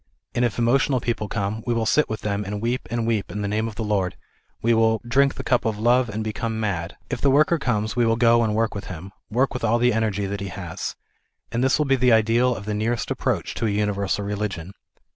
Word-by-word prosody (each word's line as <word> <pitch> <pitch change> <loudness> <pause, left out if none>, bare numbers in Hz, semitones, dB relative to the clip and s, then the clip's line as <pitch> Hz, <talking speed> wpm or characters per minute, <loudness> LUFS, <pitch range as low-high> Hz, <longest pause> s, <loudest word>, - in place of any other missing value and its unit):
And 120 - +1
if 120 -4 0
emotional 130 +3 +2
people 115 -3 -2
come 105 +1 -3
we 120 - +1
will 115 -1 0
sit 150 +7 +3
with 110 -1 -4
them 105 0 -1
and 105 +1 -4
weep 120 +3 -2
and 115 0 -1
weep 110 -3 0
in 105 0 -4
the - - -1
name 110 +2 0
of 110 - -7
tlie 110 -1 -3
Lord; 95 -4 0 0.4
we 115 +1 +2
will 110 0 +3
" - - -13
drink 135 +3 +3
the - - -6
cup 125 - +2
of 110 -2 -1
love 120 +2 +3
and 110 +1 -3
become 110 +1 -3
mad." 90 -6 -2
If - - -3
the 140 - +4
worker 155 +4 +4
comes 110 -5 -1
we 120 - +3
will 115 - +3
go 115 0 +4
and 105 -1 0
work 115 0 +1
with 100 - -6
him, 90 +2 -8 0.2
work 125 +5 +1
with 125 - -5
all 115 +1 +3
the 120 0 +3
energy 105 -2 0
that 100 0 -4
he 100 - -3
has. 90 -3 -5 0.6
And 120 +2 0
this 130 - +3
will 150 - +1
be 135 -1 +3
the 125 -2 +4
ideal 115 +3 +3
of 100 - -8
the 105 - -2
nearest 115 +3 -1
approach - - -1
to 115 - -1
a - - +1
universal 100 -1 0
religion. 100 -3 -4
110 Hz, 255 wpm, -23 LUFS, 105-120 Hz, 0.6 s, the